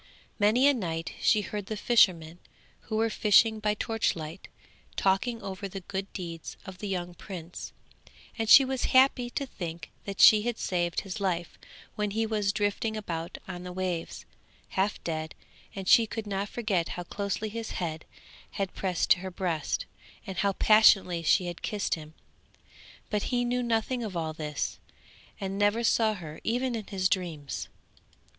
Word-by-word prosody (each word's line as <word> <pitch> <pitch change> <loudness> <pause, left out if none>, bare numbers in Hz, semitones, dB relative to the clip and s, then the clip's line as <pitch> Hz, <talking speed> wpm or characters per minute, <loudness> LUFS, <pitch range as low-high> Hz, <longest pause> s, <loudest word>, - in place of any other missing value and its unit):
Many 220 +6 +5
a 285 - +6
night 165 -8 -3
she 215 -3 +4
heard 205 -1 -5
the 215 - -4
fishermen, 175 -8 +3 0.5
who 220 - -3
were 225 +1 +1
fishing 220 +1 +4
by 210 0 0
torchlight, 190 -7 -2 0.5
talking 195 +5 +1
over 195 +1 -5
the 195 +1 -6
good 195 +1 -5
deeds 170 -3 -7
of 190 -2 -9
the 205 - -4
young 180 -2 -3
prince; 175 -1 -8 0.6
and 225 -1 -2
she 275 - +10
was 260 -1 -1
happy 260 -2 +4
to 275 +3 -3
think 170 - -7
that 200 -1 -6
she 215 -1 +9
had 235 +1 -2
saved 175 -2 -1
his 195 +1 -6
life 175 -3 -2 0.3
when 210 -1 -1
he 220 +3 0
was 210 -2 0
drifting 215 +1 -1
about 170 -4 -4
on 180 -2 -6
the 180 0 -7
waves, 180 -2 -3 0.4
half 195 +2 0
dead, 160 -1 -4 0.4
and 195 -1 -6
she 230 +2 +6
could 220 0 -5
not 200 0 -2
forget 205 -8 -1
how 175 - -4
closely 200 +4 -3
his 225 +1 -5
head 160 -3 -3 0.5
had 195 -2 -2
pressed 185 -3 +2
her 190 0 -5
breast, 175 -4 -2 0.4
and 190 -2 -6
how 200 +2 +2
passionately 195 -5 +5
she 170 +2 +3
had 175 -1 -6
kissed 205 -2 -1
him; 155 -1 -6 1.0
but 210 -1 0
he 245 -1 +1
knew 250 +1 0
nothing 235 +1 0
of 200 -5 -4
all 160 -1 -2
this, 150 -2 -4 0.6
and 195 0 -3
never 205 +3 +2
saw 220 -2 +3
her 160 -5 -9
even 245 +2 0
in 220 -3 -4
his 190 -2 +1
dreams. 165 -7 -3
195 Hz, 165 wpm, -28 LUFS, 175-220 Hz, 1.0 s, she